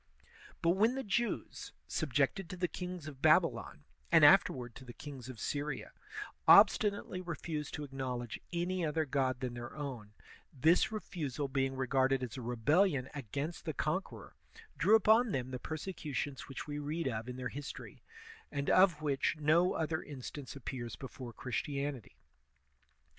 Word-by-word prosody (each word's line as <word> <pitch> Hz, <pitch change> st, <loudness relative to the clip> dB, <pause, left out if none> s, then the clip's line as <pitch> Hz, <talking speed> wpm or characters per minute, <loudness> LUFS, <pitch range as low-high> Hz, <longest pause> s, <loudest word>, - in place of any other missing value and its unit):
But 170 Hz, -, +5 dB
when 220 Hz, +7 st, +3 dB
the 270 Hz, -, -2 dB
Jews, 235 Hz, +3 st, -2 dB
subjected 195 Hz, -5 st, 0 dB
to 180 Hz, -, -6 dB
the 180 Hz, 0 st, +1 dB
kings 180 Hz, -3 st, -6 dB
of 140 Hz, -3 st, -9 dB
Babylon, -, -, +3 dB, 0.3 s
and -, -, +8 dB
afterward 125 Hz, -2 st, +5 dB
to 130 Hz, -, -11 dB
the 120 Hz, -2 st, -10 dB
kings 135 Hz, -3 st, -9 dB
of 125 Hz, -4 st, -8 dB
Syria, 145 Hz, +4 st, -3 dB, 0.6 s
obstinately 200 Hz, -4 st, +6 dB
refused 155 Hz, -3 st, -4 dB
to 150 Hz, -, -5 dB
acknowledge 130 Hz, -4 st, -4 dB
any 175 Hz, +1 st, -1 dB
other 160 Hz, 0 st, 0 dB
god 130 Hz, -2 st, 0 dB
than 125 Hz, -2 st, -2 dB
their 120 Hz, +1 st, -7 dB
own, 125 Hz, -8 st, -6 dB, 0.4 s
this 160 Hz, -, +3 dB
re 215 Hz, -, -2 dB
fusal 145 Hz, -5 st, -3 dB
being 135 Hz, -1 st, +1 dB
regarded 130 Hz, 0 st, +2 dB
as 125 Hz, 0 st, -5 dB
a 130 Hz, -, -5 dB
rebellion 130 Hz, -, +2 dB
against 145 Hz, +5 st, -4 dB
the 160 Hz, -, -3 dB
conqueror, 185 Hz, +6 st, -3 dB, 0.4 s
drew 210 Hz, +3 st, +5 dB
upon 225 Hz, +1 st, +5 dB
them 130 Hz, 0 st, -2 dB
the 125 Hz, -, -4 dB
persecutions 150 Hz, -4 st, -4 dB
which 135 Hz, -, -6 dB
we 145 Hz, 0 st, -4 dB
read 150 Hz, +2 st, -2 dB
of 115 Hz, -1 st, -3 dB
in 125 Hz, -, -5 dB
their 125 Hz, -1 st, -4 dB
history, 145 Hz, +1 st, -8 dB, 0.5 s
and 140 Hz, 0 st, -1 dB
of 180 Hz, -5 st, +5 dB
which 140 Hz, 0 st, +1 dB
no 160 Hz, +4 st, +4 dB
other 160 Hz, 0 st, -1 dB
instance 140 Hz, 0 st, -8 dB
appears 125 Hz, -2 st, -5 dB
before 130 Hz, -2 st, -8 dB
Christianity. 140 Hz, +1 st, -4 dB
145 Hz, 155 wpm, -34 LUFS, 130-170 Hz, 0.6 s, and